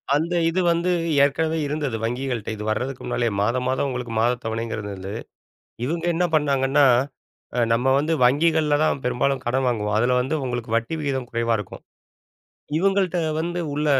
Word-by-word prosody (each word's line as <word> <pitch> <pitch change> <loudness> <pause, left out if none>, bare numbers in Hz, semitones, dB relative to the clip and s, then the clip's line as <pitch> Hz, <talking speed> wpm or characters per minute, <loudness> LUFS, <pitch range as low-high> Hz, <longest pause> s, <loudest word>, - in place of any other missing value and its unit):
அந்த 165 +4 0 0.2
இது 180 +3 -1
வந்து 170 +2 0 0.3
ஏற்கனவே 160 +3 +1
இருந்தது 145 -5 -2
வங்கிகள்ட்ட, 120 -1 -2
இது 105 - -7
வர்றதுக்கு 125 +4 -2
முன்னாலேயே 120 -2 0
மாதம் 120 +4 0
மாதம் 130 +2 0
உங்களுக்கு 125 -2 -4
மாதத் 120 +1 +1
தவணைங்கறது 110 -2 -3
அது. 95 +1 -7 0.7
இவங்க 165 +4 -2
என்ன 180 +2 +1
பண்ணாங்கன்னா, 140 -1 +3 0.7
அ - - +2
நம்ம 125 +3 +2
வந்து 155 +3 0
வங்கிகள்ல 150 +2 +3
தான் 140 - +1
பெரும்பாலும் 130 +2 0
கடன் 130 +2 +1
வாங்குவோம். 105 -3 -1
அதுல 125 +2 +2
வந்து 135 +5 -1
உங்களுக்கு 120 -2 -3
வட்டி 115 +8 -1
விகிதம் 135 -4 -2
குறைவா 115 -1 0
இருக்கும். 105 - -8 1.0
இவங்கள்ட்ட 190 -1 +1 0.2
வந்து 175 +2 -2
உள்ள 150 +1 -1
130 Hz, 155 wpm, -23 LUFS, 115-155 Hz, 1.0 s, பண்ணாங்கன்னா